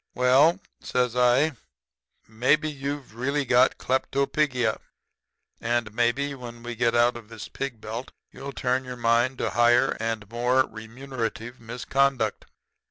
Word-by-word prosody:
"'Well,' 135 +8 +4 0.2
says 125 -1 -1
I, 125 +5 +4 0.8
'maybe 130 +8 +2
you've 140 -3 -5
really 140 +5 -1
got 125 -1 +4
kleptopigia. 130 -2 0 0.8
And 115 -2 -1
maybe 120 +5 +1
when 120 -3 -10
we 120 0 -5
get 120 0 +1
out 120 +1 +4
of 115 -2 -10
the 115 -2 -8
pig 135 -5 -4
belt 115 +4 -6 0.2
you'll 140 +1 -8
turn 130 -1 -1
your 125 -1 -7
mind 120 +2 +2
to - - -1
higher 120 +1 +4
and 115 -2 -3
more 125 +4 +2
remunerative 115 +1 -6
misconduct. 120 0 0
125 Hz, 130 wpm, -25 LUFS, 115-135 Hz, 0.8 s, Well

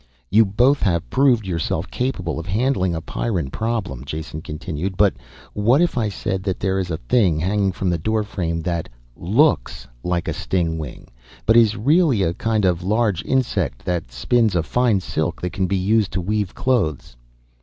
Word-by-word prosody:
"You 110 +3 +6
both 125 +8 +3
have 85 - +1
proved 130 -6 +3
yourself 85 -4 -2
capable 90 - -2
of 80 - -7
handling 95 -3 +1
a 80 - -3
Pyrran 85 - -2
problem." 110 - -3
Jason 80 +2 -6
continued. 85 +4 -5
"But 100 -1 +4 0.4
what 115 +7 +3
if 175 0 +2
I 115 -4 0
said 95 -1 -3
that 95 -1 -2
there 95 0 0
is 95 -1 -3
a 80 - -2
thing 85 - +2
hanging 100 +3 +1
from 95 0 -1
the 85 - -1
doorframe 95 -4 -1
that 85 -2 -2 0.3
looks 95 - +1 0.2
like 90 -1 -1
a - - -1
stingwing, 80 -5 -3 0.4
but 115 - +4
is 110 -2 +5
really 140 - +3
a 85 - +1
kind 110 +1 0
of 90 -1 +1
large 105 0 +1
insect 115 - -1
that 85 -8 -2
spins 110 - +1
a 85 - +2
fine 115 +2 +1
silk 80 -1 -2
that 90 -1 -3
can 95 -1 0
be 95 +1 0
used 105 +2 +1
to 90 - -1
weave 105 +1 -2
clothes?" 85 - -1
95 Hz, 175 wpm, -21 LUFS, 85-110 Hz, 0.4 s, You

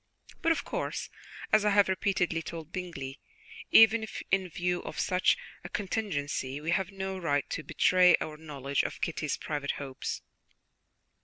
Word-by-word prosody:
But, 330 - +3
of 330 - 0
course, - - -3 0.4
as 215 -1 +6
I 210 - +4
have 205 0 +5
repeatedly 185 -3 0
told 165 -1 -7
Bingley, 155 -8 -5 0.5
even 225 0 +7 0.2
in 190 -1 +2
view 175 +2 -1
of - - -7
such 180 - +3 0.3
a - - -7
contingency 150 -10 -2
we 160 +3 -2
have 185 +1 +1
no 190 -1 -4
right 145 -6 0
to - - -2
betray 180 +2 +5
our 155 - -4
knowledge 140 -3 -2
of - - -4
Kitty's 155 -3 -2
private 145 -2 -2
hopes." 135 -2 -5
175 Hz, 150 wpm, -30 LUFS, 150-195 Hz, 0.5 s, even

